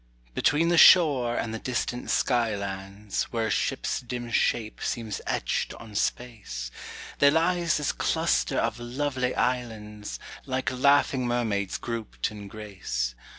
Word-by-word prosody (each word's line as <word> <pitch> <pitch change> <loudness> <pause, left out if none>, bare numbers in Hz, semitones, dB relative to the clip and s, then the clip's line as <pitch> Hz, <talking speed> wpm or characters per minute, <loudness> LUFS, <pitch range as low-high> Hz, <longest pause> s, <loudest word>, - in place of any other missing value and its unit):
Between 150 - +2
the 175 -1 +4
shore 135 -9 +7
and 110 - -2
the 110 - -4
distant 125 0 -3
sky 120 -4 +2
lands, 100 +1 -4
Where 115 -2 -2
a - - -1
ship's - - 0
dim 120 -1 -6
shape 110 -1 0
seems 110 -4 -3
etched - - -1
on 110 -2 -11
space, 105 - -3 0.5
There 140 - +7
lies 170 +2 +2
this 150 -2 0
cluster 60 0 +1
of - - 0
lovely 125 +1 -2
islands, 110 -4 -2 0.3
Like 130 0 -1
laughing 135 -1 +3
mermaids 110 -5 0
grouped 115 -4 -4
in 105 -1 -9
grace. 95 - -4
120 Hz, 135 wpm, -27 LUFS, 105-130 Hz, 0.5 s, shore